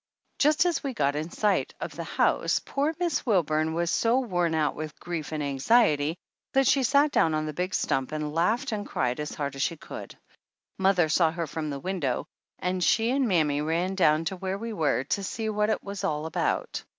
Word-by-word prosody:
Just 300 Hz, +3 st, +4 dB
as 350 Hz, -2 st, 0 dB
we 270 Hz, -3 st, -3 dB
got 140 Hz, -3 st, +1 dB
in 155 Hz, +3 st, -3 dB
sight 205 Hz, +2 st, 0 dB
of -, -, -5 dB
the -, -, -4 dB
house -, -, +1 dB
poor 290 Hz, +3 st, -1 dB
Miss 350 Hz, -2 st, 0 dB
Wilburn 160 Hz, -, +1 dB
was 170 Hz, 0 st, 0 dB
so 235 Hz, +3 st, +3 dB
worn 175 Hz, -9 st, 0 dB
out 155 Hz, -2 st, +1 dB
with 155 Hz, -1 st, -7 dB
grief 170 Hz, -4 st, -5 dB
and 155 Hz, -1 st, -2 dB
anxiety 150 Hz, -, +2 dB, 0.4 s
that 270 Hz, 0 st, +4 dB
she 275 Hz, +1 st, +4 dB
sat 280 Hz, +3 st, +3 dB
down 160 Hz, -, +3 dB
on 155 Hz, 0 st, -1 dB
the 155 Hz, -, -4 dB
big 180 Hz, +4 st, -2 dB
stump 135 Hz, +1 st, 0 dB
and 150 Hz, -1 st, -3 dB
laughed 220 Hz, -, +1 dB
and 210 Hz, -2 st, -2 dB
cried 125 Hz, +1 st, -1 dB
as 150 Hz, 0 st, -4 dB
hard 140 Hz, -2 st, -3 dB
as 135 Hz, -, -4 dB
she 165 Hz, +3 st, 0 dB
could. -, -, -9 dB, 0.6 s
Mother 190 Hz, -3 st, +3 dB
saw 160 Hz, +1 st, +3 dB
her 165 Hz, +1 st, -3 dB
from 155 Hz, +1 st, -4 dB
the 140 Hz, -1 st, -4 dB
window 160 Hz, -7 st, -2 dB, 0.3 s
and 180 Hz, 0 st, -1 dB
she 225 Hz, +6 st, +3 dB
and 270 Hz, -1 st, +2 dB
mammy 155 Hz, -7 st, +2 dB
ran 170 Hz, +5 st, 0 dB
down 165 Hz, -4 st, +3 dB
to 190 Hz, -, -2 dB
where 190 Hz, +1 st, -3 dB
we 230 Hz, +2 st, -5 dB
were 155 Hz, -8 st, +1 dB
to 195 Hz, +8 st, -2 dB
see 220 Hz, +3 st, -3 dB
what 210 Hz, 0 st, +1 dB
it -, -, -1 dB
was 200 Hz, -1 st, -6 dB
all 155 Hz, -5 st, -1 dB
about. 160 Hz, -, -2 dB
175 Hz, 210 wpm, -27 LUFS, 155-215 Hz, 0.6 s, Just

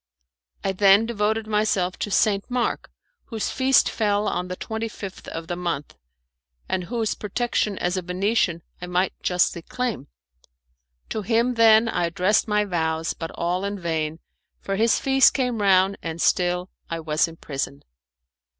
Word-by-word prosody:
I 195 Hz, -, +1 dB
then 195 Hz, +2 st, +5 dB
devoted 220 Hz, -1 st, 0 dB
myself 210 Hz, -4 st, 0 dB
to -, -, -2 dB
St. 200 Hz, +1 st, +1 dB
Mark, 245 Hz, -1 st, -1 dB, 0.4 s
whose 225 Hz, -4 st, -3 dB
feast 265 Hz, 0 st, +4 dB
fell 210 Hz, -1 st, 0 dB
on 180 Hz, -, -2 dB
the 180 Hz, -, -4 dB
twenty 220 Hz, +4 st, -4 dB
fifth 200 Hz, -3 st, -9 dB
of 165 Hz, 0 st, -6 dB
the 175 Hz, -, -4 dB
month, 170 Hz, -5 st, -4 dB, 0.7 s
and 185 Hz, -1 st, -2 dB
whose 225 Hz, +1 st, -1 dB
protection 210 Hz, -1 st, -1 dB
as 180 Hz, +2 st, -1 dB
a -, -, -1 dB
Venetian 180 Hz, -1 st, 0 dB, 0.2 s
I 180 Hz, -, -5 dB
might 180 Hz, +1 st, 0 dB
justly 180 Hz, -1 st, +1 dB
claim. 250 Hz, +5 st, -4 dB, 1.0 s
To 220 Hz, -, -2 dB
him, 235 Hz, +3 st, +1 dB
then, 225 Hz, -1 st, +6 dB
I 180 Hz, -6 st, 0 dB
addressed 185 Hz, +7 st, +1 dB
my 210 Hz, -1 st, +2 dB
vows, 160 Hz, -3 st, -1 dB
but 165 Hz, -, -6 dB
all 175 Hz, +2 st, -1 dB
in 200 Hz, 0 st, -3 dB
vain, 160 Hz, -2 st, -2 dB, 0.4 s
for 195 Hz, -, -3 dB
his 225 Hz, +3 st, +3 dB
feast 270 Hz, 0 st, +4 dB
came 250 Hz, -5 st, 0 dB
round 195 Hz, 0 st, +4 dB
and 165 Hz, 0 st, -5 dB
still 180 Hz, +1 st, +1 dB, 0.2 s
I 165 Hz, -, -3 dB
was 155 Hz, +1 st, +1 dB
in 165 Hz, -, -10 dB
prison. 140 Hz, -1 st, -5 dB
195 Hz, 160 wpm, -24 LUFS, 175-220 Hz, 1.0 s, then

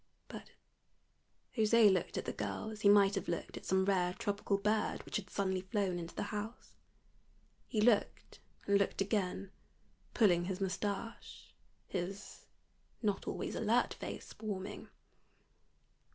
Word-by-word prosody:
But -, -, -9 dB, 1.1 s
José 220 Hz, -2 st, +6 dB
looked 185 Hz, -, -1 dB
at -, -, -2 dB
the -, -, -3 dB
girl 220 Hz, -, -3 dB
as 215 Hz, -1 st, -8 dB
he 200 Hz, -, +6 dB
might 200 Hz, -1 st, +6 dB
have 195 Hz, -3 st, -2 dB
looked 170 Hz, -, -3 dB
at -, -, -8 dB
some 190 Hz, 0 st, +3 dB
rare 180 Hz, -2 st, +2 dB
tropical 200 Hz, 0 st, 0 dB
bird 210 Hz, +2 st, 0 dB
which -, -, -2 dB
had 195 Hz, -3 st, -6 dB
suddenly 190 Hz, -1 st, 0 dB
flown 190 Hz, -2 st, -1 dB
into 170 Hz, 0 st, -7 dB
the -, -, -2 dB
house. 215 Hz, +3 st, -5 dB, 0.9 s
He 215 Hz, -, 0 dB
looked 215 Hz, -2 st, +2 dB, 0.3 s
and 200 Hz, 0 st, +4 dB
looked 200 Hz, -, 0 dB
again, 195 Hz, -1 st, -1 dB, 0.6 s
pulling 175 Hz, -6 st, +4 dB
his 185 Hz, 0 st, -3 dB
mustache, 200 Hz, +3 st, -4 dB, 0.3 s
his 195 Hz, +2 st, -5 dB, 0.6 s
not 205 Hz, -2 st, 0 dB
always -, -, -3 dB
alert -, -, +2 dB
face -, -, -7 dB
warming. 200 Hz, -3 st, -5 dB
200 Hz, 135 wpm, -35 LUFS, 190-210 Hz, 1.1 s, José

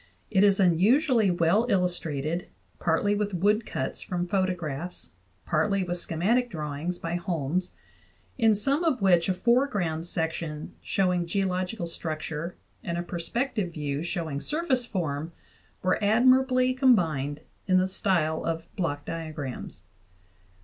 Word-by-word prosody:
It 195 Hz, -2 st, +4 dB
is 200 Hz, -1 st, +4 dB
unusually 215 Hz, -, +4 dB
well 175 Hz, +6 st, +2 dB
illustrated, 170 Hz, -4 st, -1 dB, 0.3 s
partly 175 Hz, +5 st, +2 dB
with 205 Hz, -2 st, -1 dB
wood 210 Hz, +5 st, +2 dB
cuts -, -, -3 dB
from 175 Hz, -1 st, -2 dB
photographs, 180 Hz, -4 st, -2 dB, 0.3 s
partly 200 Hz, -2 st, +1 dB
with 175 Hz, 0 st, -2 dB
schematic 220 Hz, +11 st, +1 dB
drawings 155 Hz, 0 st, -4 dB
by 170 Hz, +1 st, -3 dB
Holmes, 175 Hz, 0 st, -2 dB, 0.6 s
in 225 Hz, -4 st, +4 dB
some 275 Hz, -, +1 dB
of 270 Hz, -10 st, +1 dB
which 175 Hz, -2 st, +4 dB
a -, -, +3 dB
fore 240 Hz, +8 st, +3 dB
ground 170 Hz, -, -2 dB
section 160 Hz, -2 st, -3 dB
showing 180 Hz, -3 st, 0 dB
geological 185 Hz, +1 st, -1 dB
structure 160 Hz, 0 st, -4 dB, 0.3 s
and 170 Hz, 0 st, -3 dB
a 175 Hz, -, -2 dB
perspective 185 Hz, +3 st, -2 dB
view 145 Hz, -2 st, -3 dB
showing 165 Hz, -5 st, -3 dB
surface 290 Hz, -6 st, 0 dB
form 160 Hz, -5 st, -3 dB, 0.5 s
were 185 Hz, +3 st, +1 dB
admirably 255 Hz, +4 st, +4 dB
combined 165 Hz, -, +2 dB, 0.3 s
in 185 Hz, -1 st, +4 dB
the 185 Hz, 0 st, +3 dB
style 170 Hz, -5 st, 0 dB
of 165 Hz, 0 st, -2 dB
block 145 Hz, -5 st, -2 dB
diagrams. 155 Hz, -, -6 dB
180 Hz, 130 wpm, -27 LUFS, 165-210 Hz, 0.6 s, It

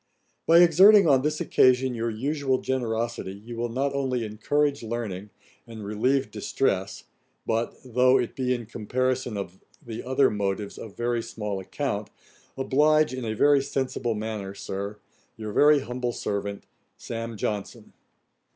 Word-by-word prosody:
'By 170 Hz, +1 st, +7 dB
exerting 190 Hz, +3 st, +7 dB
on 135 Hz, -3 st, +5 dB
this 150 Hz, +2 st, -1 dB
occasion 130 Hz, 0 st, +3 dB
your 115 Hz, 0 st, -2 dB
usual 135 Hz, +4 st, -1 dB
generosity, 120 Hz, -6 st, -2 dB
you 115 Hz, +4 st, -9 dB
will 120 Hz, +1 st, -2 dB
not 135 Hz, +4 st, -1 dB
only 130 Hz, -4 st, -1 dB
encourage 140 Hz, +7 st, 0 dB
learning, 110 Hz, -4 st, -5 dB, 0.4 s
and 110 Hz, -3 st, -8 dB
relieve 130 Hz, +7 st, 0 dB
distress, 95 Hz, -8 st, -1 dB, 0.4 s
but 115 Hz, +1 st, -1 dB
(though 125 Hz, +1 st, +4 dB
it 125 Hz, -3 st, -2 dB
be 130 Hz, -1 st, -1 dB
in 120 Hz, -2 st, -6 dB
comparison 125 Hz, +1 st, -2 dB
of 95 Hz, -2 st, -6 dB, 0.2 s
the 120 Hz, -6 st, -7 dB
other 130 Hz, +2 st, +2 dB
motives 100 Hz, 0 st, -3 dB
of 105 Hz, -3 st, -10 dB
very 120 Hz, 0 st, 0 dB
small 105 Hz, -3 st, -4 dB
account) 95 Hz, -, -3 dB, 0.5 s
oblige 150 Hz, +2 st, +3 dB
in 130 Hz, -2 st, -4 dB
a 110 Hz, -1 st, -2 dB
very 145 Hz, +4 st, +4 dB
sensible 130 Hz, -4 st, -2 dB
manner, 105 Hz, -2 st, -5 dB
Sir, 100 Hz, +2 st, -5 dB, 0.4 s
'Your 110 Hz, -2 st, -6 dB
very 150 Hz, +2 st, +5 dB
humble 125 Hz, -1 st, -3 dB
servant, 100 Hz, -1 st, -3 dB, 0.3 s
'SAM. 115 Hz, -1 st, -6 dB
JOHNSON.' 105 Hz, -1 st, -4 dB
120 Hz, 140 wpm, -26 LUFS, 110-135 Hz, 0.5 s, By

